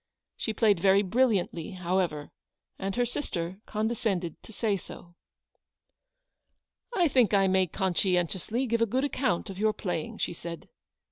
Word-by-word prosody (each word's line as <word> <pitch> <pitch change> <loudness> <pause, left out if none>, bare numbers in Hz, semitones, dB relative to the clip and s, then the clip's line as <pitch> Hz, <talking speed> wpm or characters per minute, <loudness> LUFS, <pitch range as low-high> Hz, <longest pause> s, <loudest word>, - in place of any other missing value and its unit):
She 220 - -2
played 215 -4 +3
very 195 +2 +5
brilliantly, 200 -5 +1
however, 180 -4 -1 0.5
and 195 0 -2
her 245 - +2
sister 185 -8 -3
condescended 215 -6 -1
to - - -13
say 215 -1 0
so. 175 -2 -10 1.8
"I 355 -3 +4
think 250 -7 +4
I 195 -1 +5
may 190 -1 +3
conscientiously 190 +6 0
give 230 -1 0
a 230 - +4
good 255 +6 0
account 255 -9 0
of 190 - -9
your 215 0 +3
playing," 175 -6 -3
she - - -2
said. 170 0 -8
195 Hz, 140 wpm, -28 LUFS, 175-225 Hz, 1.8 s, very